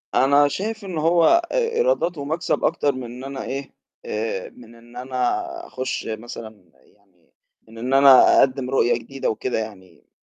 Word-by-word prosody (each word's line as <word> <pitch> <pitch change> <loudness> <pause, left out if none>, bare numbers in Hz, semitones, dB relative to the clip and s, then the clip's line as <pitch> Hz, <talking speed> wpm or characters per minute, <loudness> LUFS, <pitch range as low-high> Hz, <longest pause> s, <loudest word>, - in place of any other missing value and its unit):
أنا 140 +2 +4
شايف 210 +6 -4
إن 180 -4 -5
هو 165 +1 +3 0.3
آآ - - -1 0.2
إيراداته 465 - +1
ومكسب 160 +5 -2
أكتر 145 -3 +1
من 130 - -6
إن 120 +2 -9
أنا 135 0 -6
إيه، 135 +1 -6 0.3
آآ 105 -3 -3
من 115 -1 -16
إن 120 +1 -18
أنا 125 -1 -1 0.3
أخُش 130 0 -4
مثلًا 110 -5 -8
يعني 95 -5 -31 0.3
من 115 - -15
إن 125 +4 -3
أنا 135 -1 +7
أقدّم 130 -1 +1
رؤية 130 -2 +2
جديدة 135 +4 -4
وكده 110 +1 -2
يعني. 95 -6 -10
130 Hz, 160 wpm, -22 LUFS, 115-145 Hz, 0.3 s, أنا